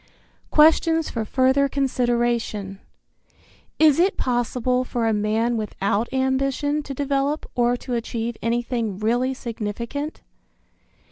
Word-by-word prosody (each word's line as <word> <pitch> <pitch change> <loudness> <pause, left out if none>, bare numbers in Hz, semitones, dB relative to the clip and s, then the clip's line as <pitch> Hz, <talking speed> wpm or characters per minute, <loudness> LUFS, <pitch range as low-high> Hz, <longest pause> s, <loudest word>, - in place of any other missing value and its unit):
Questions 320 +1 +4
for 230 - -2
Further 265 +4 +2
Consideration. 240 -7 -1 1.0
Is 310 -1 +5
it 375 +3 +2
possible 250 0 0
for 240 -2 -2
a 225 - +2
man 220 +3 0
without 210 +1 -1
ambition 270 +3 0
to 280 -2 -7
develop 280 +2 -1
or 245 0 +2
to 250 - -6
achieve 235 0 -3
anything 230 -3 -1
really 245 +5 0
significant? 235 +5 -5
245 Hz, 110 wpm, -23 LUFS, 230-275 Hz, 1.0 s, Is